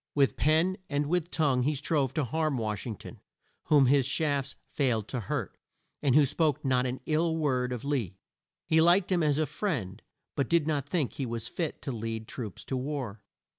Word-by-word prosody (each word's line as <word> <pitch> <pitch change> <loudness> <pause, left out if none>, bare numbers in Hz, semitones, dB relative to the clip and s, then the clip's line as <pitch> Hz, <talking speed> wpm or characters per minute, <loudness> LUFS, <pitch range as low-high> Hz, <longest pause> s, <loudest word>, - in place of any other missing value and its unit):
With 140 -2 +3
pen 160 +5 +2
and 145 0 0
with 170 +2 0
tongue 140 -7 +2
he 145 +4 +1
strove 140 -2 0
to 155 - +1
harm 155 +2 0
Wash 110 -1 -3
ing 110 - -3
ton, - - -11 0.5
whom 145 -3 +5
his 135 0 +4
shafts 140 -1 0 0.2
failed 115 -7 0
to 125 - -2
hurt, 105 - -3 0.5
and 135 -3 +3
who 150 -1 +7
spoke 150 +1 +1
not 130 -1 +2
an 125 +1 -4
ill 160 +1 +1
word 130 -5 0
of 125 +1 -4
Lee. 120 - -1 0.5
He 160 0 +4
liked 175 +3 +4
him 180 -2 +3
as 150 -2 +2
a 155 - +2
friend 120 - -3 0.3
but 140 -3 0
did 170 -3 +3
not 150 -4 -1
think 160 -8 0
he 135 - -3
was 115 -1 -4
fit 165 -4 -4
to 135 - -3
lead 115 -1 -4
troops 110 -7 -6
to 135 - -3
war. 130 -6 -4
140 Hz, 200 wpm, -29 LUFS, 125-155 Hz, 0.5 s, who